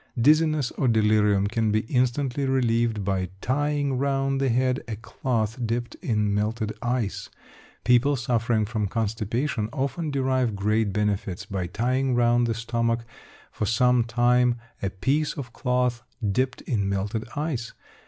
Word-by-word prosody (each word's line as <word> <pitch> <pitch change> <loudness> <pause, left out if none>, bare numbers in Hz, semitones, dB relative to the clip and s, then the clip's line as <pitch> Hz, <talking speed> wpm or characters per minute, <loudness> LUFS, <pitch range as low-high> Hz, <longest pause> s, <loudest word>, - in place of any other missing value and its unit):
Dizziness 155 0 +3
or 135 - +2
delirium 105 -3 +3
can 110 +1 0
be 110 +1 +2
instantly 130 +3 0
relieved 115 -5 +1
by 95 -2 -1
tying 145 +2 0
round 135 0 0
the 135 - +2
head 125 +2 +1
a 110 - -3
cloth 115 0 -2
dipped 120 +1 -2
in 105 - 0
melted 110 +1 -1
ice. 120 -4 -2 0.5
People 125 +4 +4
suffering 115 -2 +1
from 105 -1 -2
constipation 110 +3 -1
often 140 +3 -2
derive 130 -5 0
great 105 +1 +1
benefit 100 -2 -1
by 95 -3 -2
tying 125 +7 0
round 120 0 +3
the 115 - -1
stomach 115 0 -1 0.5
for 105 - -2
some 125 +1 +3
time 120 +1 +3 0.3
a 100 - 0
piece 140 +11 0
of 125 -4 -7
cloth 125 -2 0 0.3
dipped 130 +5 0
in 100 -5 -1
melted 100 +4 -2
ice. 145 -6 -3
120 Hz, 140 wpm, -25 LUFS, 110-130 Hz, 0.5 s, People